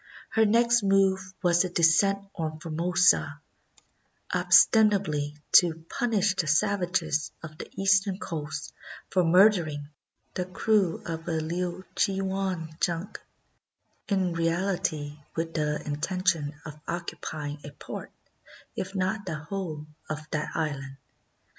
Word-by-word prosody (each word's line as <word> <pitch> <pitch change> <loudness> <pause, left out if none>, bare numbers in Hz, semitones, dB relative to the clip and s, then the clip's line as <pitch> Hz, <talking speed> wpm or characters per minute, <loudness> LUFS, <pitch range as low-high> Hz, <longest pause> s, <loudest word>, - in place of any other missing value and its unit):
Her 220 -1 +4
next 235 +2 +4
move 195 -1 +3 0.2
was 175 0 +4
a 185 - -2
descent 195 +4 +3
on 155 -3 -4
Formosa, 175 +3 +2 0.9
ostensibly 190 - +4 0.2
to 175 -2 +7
235 - - -16
CHINA 160 - -18
punish 210 -4 +1
the 165 - 0
savages 175 -3 +1
of 155 -1 -10
the - - -7
eastern 195 0 +3
coast 155 -5 -5 0.4
for 185 - +3
murdering 165 -5 +4 0.4
the 180 - -2
crew 190 -1 +1
of 165 0 -5
a 160 -1 0
Liuchiuan 180 0 -2
junk; 175 +4 -2 0.9
in 190 -4 +1
reality 165 -3 -1 0.2
with 165 0 -3
the 150 -1 0
inten 165 +6 -3
tion 150 -4 +1
of 150 -1 -9
occupying 155 -3 -5
a 145 - -7
part, 145 - -8 0.6
if 195 +2 -5
not 190 +2 -1
the 165 - -2
whole, 155 -1 -5 0.2
of 155 0 -5
that 155 -1 -2
island. 135 -4 -3
175 Hz, 120 wpm, -27 LUFS, 155-195 Hz, 0.9 s, to